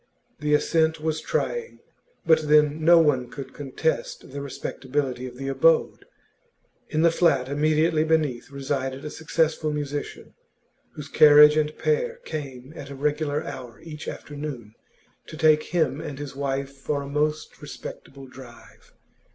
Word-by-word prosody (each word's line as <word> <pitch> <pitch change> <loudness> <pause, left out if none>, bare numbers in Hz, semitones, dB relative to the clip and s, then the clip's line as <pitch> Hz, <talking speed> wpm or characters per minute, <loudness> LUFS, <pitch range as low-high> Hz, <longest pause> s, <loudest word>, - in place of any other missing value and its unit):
The 150 0 +2
ascent 160 +1 +1
was 155 0 -2
trying, 475 -1 -2 0.5
but 160 -2 +3
then 150 +1 +4
no 170 +2 +7
one 140 -7 +2
could 135 0 -9
contest 145 0 -3
the 140 +1 -6
respectability 130 -1 -3
of 125 - -10
the 135 +1 -5
abode. 145 +4 +2 0.8
In 155 +1 +1
the 170 - +5
flat 150 -7 +2
immediately 155 +2 +2
beneath 155 -6 0
resided 135 0 -3
a 150 - -5
successful 160 -1 0
musician, 145 -1 -5 0.6
whose 150 -2 -8
carriage 150 0 +7
and 155 0 0
pair 475 +1 0
came 135 -2 -7
at 140 -3 -9
a 140 - -7
regular 150 +1 -1
hour 120 -3 -8
each 155 -2 -9
afternoon 145 -7 -7 0.5
to 155 - -9
take 155 -1 +4
him 160 -4 0
and 140 - -6
his 145 -1 -7
wife 140 0 -3
for 140 +1 -3
a - - -8
most 150 +2 -2
respectable 135 0 -9
drive. 130 -2 -15
150 Hz, 145 wpm, -25 LUFS, 135-155 Hz, 0.8 s, no